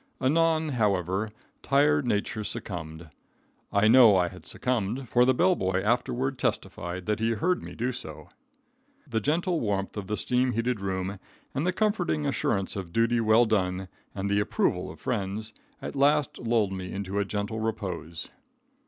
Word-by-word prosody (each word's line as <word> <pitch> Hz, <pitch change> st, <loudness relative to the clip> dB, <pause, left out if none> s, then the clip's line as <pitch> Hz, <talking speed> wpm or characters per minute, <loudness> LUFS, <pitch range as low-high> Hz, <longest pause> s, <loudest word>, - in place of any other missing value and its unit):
Anon, 160 Hz, +3 st, +2 dB
however, 100 Hz, -, 0 dB, 0.3 s
tired 145 Hz, 0 st, +3 dB
nature 105 Hz, 0 st, -1 dB
succumbed. 80 Hz, -5 st, -5 dB, 0.6 s
I 100 Hz, +2 st, +4 dB
know 115 Hz, -3 st, +8 dB
I 90 Hz, -1 st, +2 dB
had -, -, -13 dB
succumbed, 125 Hz, +1 st, -2 dB
for 125 Hz, +2 st, +4 dB
the 130 Hz, -, +4 dB
bell 185 Hz, +6 st, +4 dB
boy 95 Hz, -, 0 dB
afterward 125 Hz, +3 st, 0 dB
testified 90 Hz, -5 st, -3 dB
that 105 Hz, +1 st, 0 dB
he 115 Hz, +1 st, +1 dB
heard 180 Hz, -, 0 dB
me -, -, -9 dB
do 125 Hz, +3 st, -1 dB
so. 125 Hz, -, -8 dB, 0.8 s
The 115 Hz, -6 st, -1 dB
gentle 170 Hz, -, +1 dB
warmth 100 Hz, -3 st, -2 dB
of 105 Hz, -3 st, -5 dB
the 105 Hz, -, -2 dB
steam 125 Hz, 0 st, +1 dB
heated 115 Hz, -1 st, -1 dB
room, 95 Hz, 0 st, -3 dB, 0.3 s
and 150 Hz, +6 st, -1 dB
the -, -, +3 dB
comforting 185 Hz, -, 0 dB
assurance 95 Hz, +5 st, 0 dB
of 95 Hz, -4 st, -5 dB
duty 115 Hz, +3 st, +2 dB
well 110 Hz, +2 st, +5 dB
done 95 Hz, -3 st, 0 dB, 0.3 s
and 100 Hz, 0 st, -2 dB
the 100 Hz, 0 st, +2 dB
approval 105 Hz, -, 0 dB
of -, -, -11 dB
friends, 105 Hz, +3 st, -3 dB, 0.3 s
at -, -, -5 dB
last 145 Hz, 0 st, +2 dB
lulled 115 Hz, -4 st, +1 dB
me 95 Hz, -1 st, -5 dB
into 100 Hz, 0 st, -3 dB
a -, -, +2 dB
gentle 105 Hz, +2 st, -3 dB
repose. 95 Hz, -7 st, -4 dB
110 Hz, 160 wpm, -27 LUFS, 95-125 Hz, 0.8 s, know